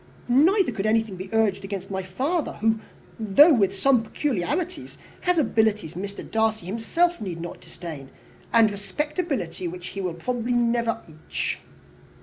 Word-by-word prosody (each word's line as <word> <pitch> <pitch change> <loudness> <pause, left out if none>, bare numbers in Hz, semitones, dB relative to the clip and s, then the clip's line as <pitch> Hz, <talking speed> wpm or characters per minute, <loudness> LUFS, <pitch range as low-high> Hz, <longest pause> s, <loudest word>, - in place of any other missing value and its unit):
Neither 330 - +4
could 200 +1 -2
anything 220 -2 +1
be 185 +1 -7
urged 215 -3 +2
against 195 -1 -5
my 190 0 -1
father, 270 - -1
who, 220 +1 +1 0.4
though 225 - +7
with 200 -5 +2
some 255 +3 +4
peculiarities, 290 - -2 0.2
has 360 -1 +1
abilities 220 - +1
which 200 +3 -4
Mr. - - -9
Darcy 220 -3 +1
himself 230 - 0
need 180 -5 -4
not 175 +1 -7
disdain, 150 -6 -8 0.4
and 225 -2 +5
respectability 250 - -3
which 180 +1 -6
he 195 - -5
will 180 -3 -2
probably 245 +6 -2
never 235 -1 +1
reach." 155 -1 -4
220 Hz, 145 wpm, -25 LUFS, 190-255 Hz, 0.4 s, though